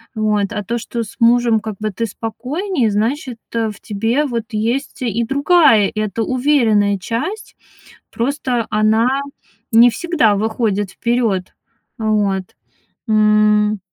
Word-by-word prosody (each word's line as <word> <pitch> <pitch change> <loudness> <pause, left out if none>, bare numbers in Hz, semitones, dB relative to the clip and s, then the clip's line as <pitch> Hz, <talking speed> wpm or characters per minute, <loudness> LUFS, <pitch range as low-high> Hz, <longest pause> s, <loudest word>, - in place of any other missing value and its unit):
Вот. 210 -2 0
А 210 - -3
то, 235 +4 -3
что 230 +1 -4
с 215 - -12
мужем 235 -1 +4
как 215 -1 -6
бы 215 -1 -2
ты 230 +4 -3
спокойнее, 250 - -2
значит 235 +4 -2
э, 225 -1 0
в 210 - -14
тебе 225 +8 -1
вот 235 -5 -3
есть 230 +7 -2
и 235 0 -1
другая, 280 - +4
эта 215 +1 -2
уверенная 230 -7 +2
часть. 280 - -5 0.6
Просто 245 -2 -1
она 225 +6 +2 0.5
не 235 +2 +7
всегда 230 - +1
выходит 210 -2 -1
вперед. 230 -6 -1 0.4
Вот. 205 -3 0 0.6
М. 210 -1 +3
225 Hz, 125 wpm, -18 LUFS, 210-245 Hz, 0.6 s, не